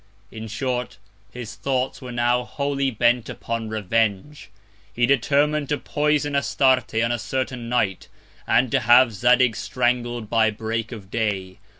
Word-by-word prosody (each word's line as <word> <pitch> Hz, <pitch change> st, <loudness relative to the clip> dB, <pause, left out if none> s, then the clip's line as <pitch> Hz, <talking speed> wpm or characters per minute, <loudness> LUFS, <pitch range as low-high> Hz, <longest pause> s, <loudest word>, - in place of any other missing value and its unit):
In 110 Hz, 0 st, -7 dB
short, 125 Hz, -1 st, -3 dB, 0.3 s
his 120 Hz, -2 st, -7 dB
Thoughts 130 Hz, 0 st, -2 dB
were 125 Hz, -1 st, -7 dB
now 120 Hz, +1 st, +1 dB
wholly 140 Hz, +1 st, -2 dB
bent 120 Hz, 0 st, +1 dB
upon 115 Hz, -1 st, -4 dB
Revenge. 110 Hz, +5 st, -1 dB, 0.4 s
He 120 Hz, -, +1 dB
determin'd 140 Hz, +3 st, +1 dB
to 145 Hz, -, +1 dB
poison 145 Hz, -1 st, 0 dB
Astarte 130 Hz, 0 st, +2 dB
on 115 Hz, +1 st, +1 dB
a 120 Hz, -, -1 dB
certain 125 Hz, 0 st, -3 dB
Night, 105 Hz, -6 st, -1 dB, 0.4 s
and 125 Hz, -1 st, +2 dB
to 135 Hz, -, +3 dB
have 120 Hz, 0 st, +5 dB
Zadig 125 Hz, +3 st, +3 dB
strangled 120 Hz, -1 st, -1 dB
by 110 Hz, 0 st, +3 dB
Break 110 Hz, +1 st, -4 dB
of 105 Hz, -4 st, -10 dB
Day. 100 Hz, -4 st, -2 dB
120 Hz, 140 wpm, -23 LUFS, 110-130 Hz, 0.4 s, have